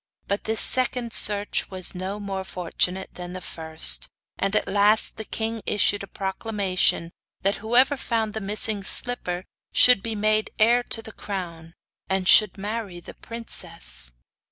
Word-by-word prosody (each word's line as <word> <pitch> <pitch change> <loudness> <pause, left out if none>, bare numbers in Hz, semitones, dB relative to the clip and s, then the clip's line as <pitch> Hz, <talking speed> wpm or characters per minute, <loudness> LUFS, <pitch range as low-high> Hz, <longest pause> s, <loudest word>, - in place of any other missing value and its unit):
But 200 +1 -3
this 220 0 +1
second 250 -2 +4
search 205 0 +2
was 185 -2 -4
no 190 +3 -6
more 195 -2 -5
fortunate 180 +1 -3
than 180 0 -8
the 185 - -6
first, 160 - +1 0.3
and 195 +2 -1
at - - 0
last 205 +2 +2
the 220 - -5
king 225 +1 -4
issued 205 -1 +1
a 200 - -8
proclamation 190 -4 -1 0.3
that 195 +1 0
whoever 245 +6 +2
found 225 -4 -2
the 220 - -5
missing 210 +1 0
slipper 190 -5 +2 0.3
should 250 -5 +6
be 225 +1 -4
made 215 +1 0
heir 235 +3 +3
to 225 -2 -1
the 220 - -10
crown, 170 -5 -8 0.3
and 190 -1 -1
should 210 -1 +6
marry 205 -2 -6
the 175 - -12
princess. 60 - -1
200 Hz, 155 wpm, -23 LUFS, 185-220 Hz, 0.3 s, should